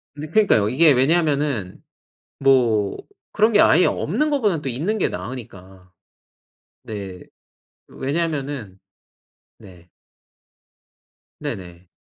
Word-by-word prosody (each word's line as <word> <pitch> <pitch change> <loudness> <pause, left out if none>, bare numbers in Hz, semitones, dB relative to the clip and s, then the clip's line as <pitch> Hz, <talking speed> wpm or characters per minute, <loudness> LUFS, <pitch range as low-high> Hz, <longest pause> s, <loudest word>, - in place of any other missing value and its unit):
네 150 +1 -7
그러니까요. 160 - +3
이게 150 +6 +5
왜냐하면은 140 - 0 0.6
뭐 120 -7 +2 0.3
그런게 215 0 +3
아예 - - +5
없는 305 0 0
것보다는 210 - 0
또 140 - -4
있는 160 - -2
게 195 - +1
나으니까. 95 -7 -9 0.9
네. 100 -4 -7 0.7
왜냐하면은 140 - -4 0.8
네. 90 -2 -16 1.5
네네. 90 -1 -7
130 Hz, 210 characters per minute, -21 LUFS, 100-160 Hz, 1.5 s, 이게